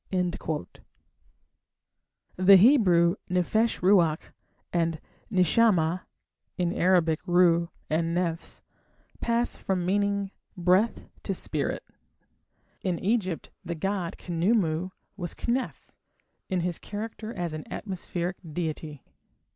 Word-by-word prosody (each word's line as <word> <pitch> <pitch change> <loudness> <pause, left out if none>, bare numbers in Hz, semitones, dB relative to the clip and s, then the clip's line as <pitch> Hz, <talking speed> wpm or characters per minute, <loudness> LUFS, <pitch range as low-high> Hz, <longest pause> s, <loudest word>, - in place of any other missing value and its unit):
The 185 +2 +7
Hebrew 185 -6 +5
"nephesh 215 +6 +1
ruach" 175 -5 +3 0.4
and 165 -2 0 0.3
"neshamah" 185 -2 +3 0.5
(in 175 -1 0
Arabic 170 -3 +3
"ruh" 175 -1 +4 0.2
and 165 +2 0
"nefs") 170 -2 -3 0.6
pass 235 +1 0
from 185 -2 -1
meaning 200 +1 0 0.3
"breath" 185 +6 +2
to - - -2
"spirit". - - -2 1.0
In 180 -3 -1
Egypt 190 -4 -1
the 170 - -4
god 185 +1 -2
Khnumu 175 -1 0 0.3
was 175 -3 -5
"Kneph" 250 +2 -2 0.6
in 185 -2 0
his 175 -1 -2
character 215 +1 -6
as 175 -7 -4
an 155 -1 -7
atmospheric 180 -2 -4
deity. 155 -4 -5
180 Hz, 95 wpm, -27 LUFS, 170-200 Hz, 1.0 s, The